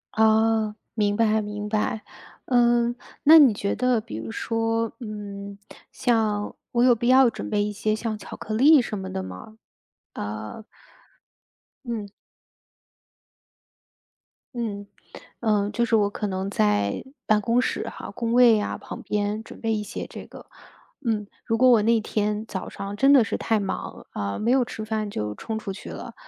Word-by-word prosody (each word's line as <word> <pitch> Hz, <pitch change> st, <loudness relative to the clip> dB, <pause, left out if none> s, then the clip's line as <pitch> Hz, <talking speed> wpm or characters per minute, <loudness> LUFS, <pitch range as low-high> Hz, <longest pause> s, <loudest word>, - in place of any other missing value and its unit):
哦， 220 Hz, 0 st, +3 dB, 0.2 s
明 205 Hz, -2 st, +1 dB
白 220 Hz, -1 st, +3 dB
明 210 Hz, 0 st, -5 dB
白。 215 Hz, +1 st, -1 dB, 0.4 s
嗯， 240 Hz, -1 st, +3 dB, 0.3 s
那 320 Hz, +2 st, +9 dB
你 275 Hz, -5 st, +7 dB
觉 200 Hz, 0 st, -2 dB
得， 250 Hz, -2 st, +2 dB
比 110 Hz, -, -8 dB
如 110 Hz, 0 st, -6 dB
说， 225 Hz, -, -1 dB
嗯， 200 Hz, -3 st, -7 dB, 0.3 s
像 215 Hz, -3 st, 0 dB, 0.2 s
我 240 Hz, 0 st, +2 dB
有 250 Hz, -1 st, +6 dB
必 240 Hz, +1 st, -2 dB
要 260 Hz, 0 st, +6 dB
准 -, -, -6 dB
备 205 Hz, -1 st, +1 dB
一 210 Hz, -, -2 dB
些 215 Hz, +1 st, -1 dB
像 220 Hz, 0 st, -3 dB
巧 205 Hz, -, -9 dB
克 215 Hz, -, -6 dB
力 285 Hz, +7 st, +7 dB
什 220 Hz, -3 st, -4 dB
么 190 Hz, -1 st, -6 dB
的 95 Hz, -, -3 dB
吗？ 95 Hz, -, -10 dB, 0.6 s
呃 105 Hz, -, -6 dB, 1.2 s
嗯。 225 Hz, -4 st, -4 dB, 2.5 s
嗯， 210 Hz, -4 st, -4 dB, 0.5 s
呃， 210 Hz, -3 st, +1 dB
就 235 Hz, +3 st, 0 dB
是 230 Hz, -1 st, +2 dB
我 205 Hz, -2 st, +3 dB
可 210 Hz, -, -3 dB
能 190 Hz, 0 st, -3 dB
在 105 Hz, -, +1 dB, 0.2 s
办 215 Hz, -1 st, +3 dB
公 230 Hz, +4 st, +2 dB
室 250 Hz, -, -1 dB
哈， -, -, -8 dB
工 230 Hz, -1 st, -2 dB
位 240 Hz, -3 st, +6 dB
啊， -, -, -3 dB
旁 -, -, -9 dB
边 210 Hz, +1 st, -2 dB
准 -, -, -12 dB
备 225 Hz, -1 st, 0 dB
一 210 Hz, -, -1 dB
些 210 Hz, -, -6 dB
这 -, -, -9 dB
个。 -, -, -13 dB, 0.6 s
嗯， 215 Hz, -3 st, 0 dB, 0.2 s
如 225 Hz, -, 0 dB
果 255 Hz, +2 st, +6 dB
我 230 Hz, -3 st, +6 dB
那 230 Hz, +1 st, +3 dB
天 210 Hz, 0 st, -1 dB
早 190 Hz, -4 st, -5 dB
上 200 Hz, +1 st, -6 dB
真 270 Hz, +6 st, +4 dB
的 275 Hz, -4 st, +7 dB
是 215 Hz, -, -3 dB
太 225 Hz, -1 st, +1 dB
忙， 195 Hz, -1 st, -5 dB
呃， 100 Hz, -1 st, -3 dB
没 230 Hz, +3 st, +1 dB
有 260 Hz, 0 st, +4 dB
吃 225 Hz, -2 st, -6 dB
饭 215 Hz, -1 st, -2 dB
就 105 Hz, -, -3 dB
冲 220 Hz, -, -5 dB
出 210 Hz, -3 st, -5 dB
去 -, -, -9 dB
了， -, -, -8 dB
215 Hz, 180 characters per minute, -25 LUFS, 205-230 Hz, 2.5 s, 那